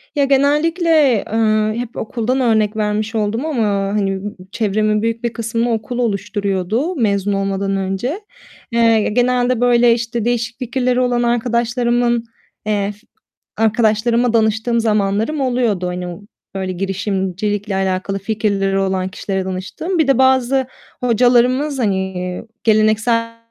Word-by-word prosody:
Ya, 285 Hz, -1 st, +3 dB
genellikle, 300 Hz, +5 st, +2 dB, 0.4 s
eee, 215 Hz, -1 st, +2 dB
hep 240 Hz, -1 st, -6 dB
okuldan 240 Hz, +3 st, -1 dB
örnek 220 Hz, -2 st, +2 dB
vermiş 215 Hz, +1 st, -1 dB
oldum 220 Hz, +6 st, -1 dB
ama, 240 Hz, -9 st, 0 dB
hani, 195 Hz, -1 st, -1 dB
b -, -, -3 dB, 0.2 s
çevremin 215 Hz, 0 st, 0 dB
büyük 230 Hz, +1 st, -2 dB
bir 235 Hz, -1 st, -1 dB
kısmını 230 Hz, +1 st, -1 dB
okul 225 Hz, +3 st, -4 dB
oluşturuyordu 205 Hz, -, -1 dB
mezun 205 Hz, -5 st, 0 dB
olmadan 195 Hz, 0 st, -1 dB
önce. 195 Hz, -, -2 dB, 0.5 s
Eee, 230 Hz, -2 st, +3 dB
genelde, 245 Hz, +1 st, +1 dB
böyle, 240 Hz, -1 st, +5 dB
işte, 235 Hz, -1 st, -3 dB
değişik 235 Hz, 0 st, -1 dB
fikirleri 250 Hz, 0 st, 0 dB
olan 245 Hz, -1 st, +1 dB
arkadaşlarımın, 240 Hz, 0 st, +1 dB, 0.4 s
eee, 205 Hz, -1 st, -1 dB, 0.6 s
arkadaşlarıma 225 Hz, +2 st, +2 dB
danıştığım 225 Hz, +1 st, +1 dB
zamanlarım 215 Hz, +6 st, 0 dB
oluyordu, 240 Hz, -8 st, 0 dB
hani, 180 Hz, -1 st, -5 dB, 0.4 s
böyle, 190 Hz, -1 st, -2 dB
girişimcilikle 195 Hz, +1 st, -2 dB
alakalı 190 Hz, +1 st, -1 dB
fikirleri 195 Hz, -2 st, 0 dB
olan 190 Hz, -1 st, 0 dB
kişilere 190 Hz, 0 st, -3 dB
danıştığım. 200 Hz, -, -4 dB
Bir 305 Hz, -, +3 dB
de 275 Hz, -, +3 dB
bazı 260 Hz, 0 st, +3 dB, 0.4 s
hocalarımız, 250 Hz, +4 st, +3 dB
hani, 190 Hz, -4 st, -2 dB, 0.2 s
geleneksel 225 Hz, +1 st, +2 dB
225 Hz, 120 wpm, -18 LUFS, 200-245 Hz, 0.6 s, böyle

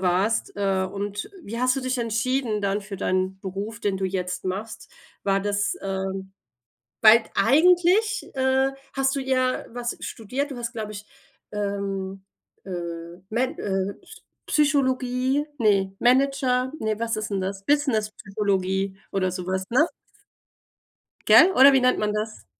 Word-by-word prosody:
warst? 190 Hz, +6 st, 0 dB
Äh, 195 Hz, -2 st, +1 dB
und 205 Hz, -, -4 dB
wie 230 Hz, -1 st, -5 dB
hast 255 Hz, +1 st, +2 dB
du 270 Hz, -, -2 dB
dich 255 Hz, 0 st, -1 dB
entschieden 230 Hz, -1 st, -1 dB
dann 200 Hz, +1 st, 0 dB
für 200 Hz, 0 st, -8 dB
deinen 185 Hz, +1 st, -1 dB
Beruf, 200 Hz, +4 st, -5 dB
den 200 Hz, -4 st, -1 dB
du 190 Hz, -, 0 dB
jetzt 180 Hz, -1 st, -3 dB
machst? 205 Hz, +4 st, -5 dB, 0.3 s
War 195 Hz, -1 st, +2 dB
das, 205 Hz, 0 st, -1 dB
ähm 190 Hz, 0 st, -4 dB, 0.7 s
weil 225 Hz, +1 st, +8 dB
t -, -, -19 dB
eigentlich, 360 Hz, +8 st, +3 dB
äh, 265 Hz, 0 st, +2 dB, 0.2 s
hast 270 Hz, 0 st, +1 dB
du -, -, 0 dB
ja 260 Hz, -1 st, 0 dB
was 240 Hz, 0 st, -4 dB
studiert. 255 Hz, +7 st, -4 dB
Du -, -, -5 dB
hast, 235 Hz, -1 st, -4 dB
glaube 215 Hz, -2 st, -5 dB
ich, 210 Hz, 0 st, -8 dB, 0.5 s
ähm, 200 Hz, -2 st, -3 dB, 0.4 s
äh, 195 Hz, -, -9 dB, 0.6 s
Med 255 Hz, +7 st, -1 dB
äh, 195 Hz, 0 st, -2 dB
Psy -, -, -15 dB, 0.2 s
Psychologie, 265 Hz, -2 st, +1 dB
ne, 200 Hz, -5 st, +2 dB
Manager, 260 Hz, 0 st, +2 dB
ne, 220 Hz, -3 st, -1 dB
was 230 Hz, -1 st, -1 dB
ist 215 Hz, 0 st, -3 dB
denn 195 Hz, -1 st, -1 dB
das, 195 Hz, +1 st, -4 dB
Business 270 Hz, -8 st, +2 dB
Psychologie 195 Hz, -1 st, -1 dB
oder 190 Hz, -1 st, 0 dB
so 180 Hz, 0 st, -5 dB
was, 190 Hz, +1 st, -2 dB
ne? 275 Hz, +7 st, +4 dB, 1.4 s
Gell, 380 Hz, -, +8 dB
oder 275 Hz, +2 st, +8 dB
wie 265 Hz, -, +4 dB
nennt 255 Hz, 0 st, +3 dB
man 210 Hz, 0 st, 0 dB
das? 215 Hz, +1 st, -4 dB
215 Hz, 150 wpm, -24 LUFS, 195-255 Hz, 1.4 s, weil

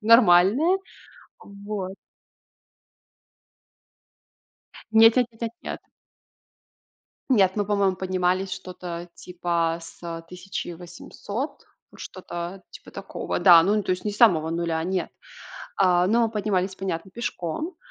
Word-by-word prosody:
нормальная. 230 Hz, -, +5 dB, 0.6 s
Вот. 200 Hz, -1 st, -6 dB, 3.0 s
Нет 225 Hz, 0 st, +7 dB
нет 250 Hz, -2 st, +3 dB
нет 225 Hz, -, -24 dB
нет 230 Hz, -, -2 dB
нет. -, -, -5 dB, 1.5 s
Нет, 195 Hz, -7 st, +4 dB
мы, 205 Hz, -, 0 dB
по-моему, 200 Hz, -2 st, +1 dB
поднимались 185 Hz, 0 st, 0 dB
что-то 175 Hz, -1 st, -7 dB
типа 170 Hz, -2 st, -2 dB
с 165 Hz, 0 st, -8 dB
1800, 180 Hz, -, -7 dB, 0.3 s
вот -, -, -17 dB
что-то 180 Hz, 0 st, -7 dB
типа -, -, -13 dB
такого. -, -, -5 dB
Да, 175 Hz, -3 st, +8 dB
ну, 205 Hz, +2 st, +1 dB
то -, -, -8 dB
есть 180 Hz, +3 st, -3 dB
не 210 Hz, -, 0 dB
с 205 Hz, -, -9 dB
самого 165 Hz, -9 st, +4 dB
0, 165 Hz, -1 st, -1 dB
нет, 185 Hz, +1 st, -2 dB, 0.7 s
э-э, 180 Hz, -1 st, +4 dB
но 230 Hz, +2 st, +2 dB
поднимались, 195 Hz, -3 st, -1 dB
понятно, 190 Hz, -2 st, -4 dB
пешком. 235 Hz, -, -4 dB
185 Hz, 110 wpm, -24 LUFS, 175-210 Hz, 3.0 s, Да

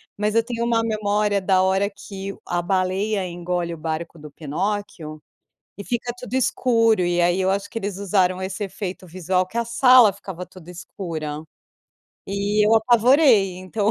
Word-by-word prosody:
mas 210 Hz, +1 st, -1 dB
eu 230 Hz, -, +4 dB
tenho 235 Hz, 0 st, -4 dB
uma 230 Hz, -1 st, +1 dB
memória 210 Hz, -2 st, 0 dB
da 185 Hz, -1 st, +3 dB
hora 190 Hz, +2 st, +1 dB
que 195 Hz, -1 st, -8 dB
a 175 Hz, 0 st, -1 dB
baleia 190 Hz, +2 st, -1 dB
engole 175 Hz, 0 st, -3 dB
o -, -, -8 dB
barco 160 Hz, +1 st, -5 dB
do 150 Hz, 0 st, -10 dB
Pinóquio 160 Hz, +1 st, -4 dB, 0.6 s
e 200 Hz, -, -7 dB
fica 240 Hz, +1 st, -3 dB
tudo 250 Hz, 0 st, -9 dB
escuro. 230 Hz, -4 st, +2 dB
E 175 Hz, 0 st, 0 dB
aí 175 Hz, +2 st, +2 dB
eu 190 Hz, -, +1 dB
acho 200 Hz, +1 st, -2 dB
que 230 Hz, -, -7 dB
eles 200 Hz, -3 st, -4 dB
usaram 185 Hz, -2 st, +1 dB
esse 190 Hz, +2 st, -4 dB
efeito 190 Hz, -1 st, -6 dB
visual 185 Hz, +1 st, -1 dB
que 205 Hz, +6 st, -8 dB
a 235 Hz, -, 0 dB
sala 235 Hz, -2 st, +6 dB
ficava 190 Hz, -3 st, -8 dB
toda 180 Hz, -2 st, -13 dB
escura. 160 Hz, -3 st, -6 dB, 0.8 s
E 205 Hz, +2 st, +1 dB
eu 225 Hz, -, +4 dB
apavorei, 235 Hz, -, +4 dB
então 200 Hz, +3 st, -1 dB
195 Hz, 170 wpm, -22 LUFS, 180-215 Hz, 0.8 s, sala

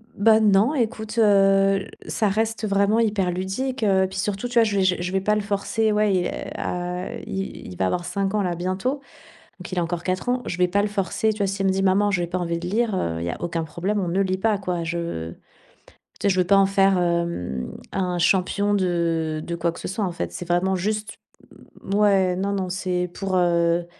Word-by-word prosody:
Bah, 220 Hz, +2 st, +5 dB
non, 210 Hz, +6 st, +4 dB
écoute, 220 Hz, -2 st, -2 dB
heu, 195 Hz, -2 st, +4 dB, 0.2 s
ça 215 Hz, -, 0 dB
reste 220 Hz, +1 st, -1 dB
vraiment 200 Hz, +3 st, +2 dB
hyper 205 Hz, -5 st, +1 dB
ludique, 200 Hz, +8 st, -3 dB
heu, 190 Hz, -2 st, +3 dB
puis, -, -, -7 dB
surtout, 205 Hz, +4 st, -2 dB
tu 245 Hz, -, -8 dB
vois, 230 Hz, -, +6 dB
je 200 Hz, -2 st, 0 dB
je 185 Hz, -1 st, +3 dB
je 180 Hz, +1 st, -3 dB
vais 190 Hz, 0 st, 0 dB
pas 210 Hz, +2 st, +2 dB
le 210 Hz, -, 0 dB
forcer, 205 Hz, +2 st, 0 dB
ouais, 210 Hz, -1 st, +2 dB
il, 180 Hz, -1 st, +1 dB
heu, -, -, -4 dB, 0.3 s
à, 180 Hz, +1 st, -3 dB
heu, -, -, -6 dB
il 195 Hz, 0 st, -5 dB
il 90 Hz, -, -10 dB
va 95 Hz, -, +1 dB
avoir 175 Hz, -, -1 dB
5 195 Hz, +2 st, -2 dB
ans 210 Hz, -, +1 dB
là, 175 Hz, -2 st, -1 dB
bientôt, 190 Hz, +11 st, -2 dB, 0.6 s
donc, -, -, -8 dB
il 180 Hz, -, -1 dB
a -, -, +2 dB
encore 170 Hz, 0 st, -3 dB
4 185 Hz, +5 st, -2 dB
ans. 250 Hz, 0 st, +1 dB
Je 170 Hz, -, -3 dB
vais 180 Hz, -, +4 dB
pas 200 Hz, +3 st, +2 dB
le 210 Hz, -, 0 dB
forcer, 205 Hz, +2 st, 0 dB
tu 215 Hz, -, -9 dB
vois? 200 Hz, -, +1 dB
S'il 195 Hz, 0 st, -1 dB
me -, -, +4 dB
dit: 190 Hz, 0 st, 0 dB
«Maman, 200 Hz, +2 st, +3 dB
j'ai 175 Hz, -3 st, 0 dB
pas 180 Hz, +2 st, -3 dB
envie 170 Hz, -1 st, -2 dB
de 175 Hz, -, -6 dB
lire», 220 Hz, +2 st, 0 dB
heu, 85 Hz, -, -1 dB
il -, -, -3 dB
y 85 Hz, -, -2 dB
a -, -, -4 dB
aucun 170 Hz, -1 st, -2 dB
problème, 185 Hz, +7 st, -2 dB
on 180 Hz, -, -2 dB
ne 190 Hz, +3 st, 0 dB
lit 185 Hz, 0 st, -1 dB
pas, 215 Hz, 0 st, +1 dB
quoi. 180 Hz, -3 st, -3 dB
Je 165 Hz, -, -3 dB, 0.9 s
tu -, -, 0 dB
sais -, -, +5 dB
je 185 Hz, -1 st, +1 dB
veux 180 Hz, -, +2 dB
pas 200 Hz, -, +5 dB
en 195 Hz, -, +6 dB
faire, 195 Hz, -1 st, +3 dB
hem, 170 Hz, -, -1 dB, 0.2 s
un 180 Hz, -2 st, -1 dB
champion 200 Hz, +3 st, +2 dB
de 165 Hz, -4 st, 0 dB
de 170 Hz, -, -3 dB
quoi 170 Hz, 0 st, 0 dB
que -, -, -11 dB
ce -, -, -5 dB
soit, 205 Hz, +1 st, -1 dB
en 180 Hz, -, -2 dB
fait. -, -, -4 dB
C'est 175 Hz, -, -6 dB
vraiment 180 Hz, +2 st, +1 dB
juste 210 Hz, +3 st, -3 dB, 0.7 s
mouais, 195 Hz, -2 st, +3 dB
non, 200 Hz, +1 st, -1 dB
non, 190 Hz, -2 st, -2 dB
c'est 180 Hz, -1 st, -2 dB
pour, 195 Hz, -1 st, -3 dB
heu, 170 Hz, -1 st, +2 dB
190 Hz, 240 wpm, -23 LUFS, 175-205 Hz, 0.9 s, vois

